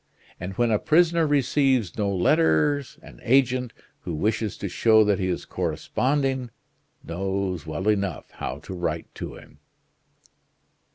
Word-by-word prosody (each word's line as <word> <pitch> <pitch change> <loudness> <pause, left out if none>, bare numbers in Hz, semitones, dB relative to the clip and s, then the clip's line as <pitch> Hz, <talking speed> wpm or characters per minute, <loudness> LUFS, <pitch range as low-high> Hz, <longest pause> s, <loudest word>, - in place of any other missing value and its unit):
And 90 +2 -5
when 120 +3 +1
a 105 - +2
prisoner 165 0 +3
receives 135 - +2
no 105 -2 0
letters, 95 - +2
an - - -14
agent, 125 -1 +2 0.3
who 85 - -5
wishes 110 +4 -1
to 100 - -4
show 110 +4 +4
that 105 -2 +1
he 95 - 0
is 90 - -2
corresponding 135 -2 -1 0.5
knows 95 -1 -3
well 80 +6 -3
enough 100 -7 -1
how - - -5
to - - -8
write 90 -1 -3
to - - -7
him." - - -16
105 Hz, 135 wpm, -25 LUFS, 95-130 Hz, 0.5 s, show